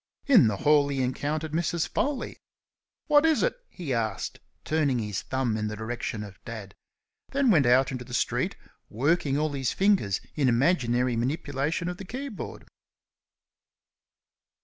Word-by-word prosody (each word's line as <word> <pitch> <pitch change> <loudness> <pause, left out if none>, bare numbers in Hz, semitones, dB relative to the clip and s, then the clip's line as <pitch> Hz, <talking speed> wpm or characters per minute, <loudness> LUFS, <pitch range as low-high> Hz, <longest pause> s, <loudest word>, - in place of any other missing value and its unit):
In 250 - +6
the 105 -2 0
hall 145 +4 +4
he 135 -2 -1
encountered 150 +5 -2
Mrs. 170 +1 0
Foley. 280 -2 -2 0.7
"What 295 -1 +5
is 320 -1 +3
it?" - - +1
he 160 -8 -4
asked, 110 -4 -2 0.3
turning 150 -5 +1
his 105 -4 -2
thumb 130 -4 -1
in 110 -1 -1
the 105 - -4
direction 110 -1 -4
of 100 -2 -12
Dad; 105 -4 -8 0.6
then 275 -3 +3
went 150 -9 +4
out 130 +2 +4
into 125 -2 -4
the 125 - -14
street, - - 0 0.3
working 145 +3 +1
all 155 0 0
his 135 -3 -1
fingers 190 - +2
in 140 -4 +2
imaginary 125 -2 +2
manipulation 145 +5 -1
of 180 0 -4
the 195 - -8
keyboard. 255 +1 -6
140 Hz, 150 wpm, -27 LUFS, 120-170 Hz, 0.7 s, In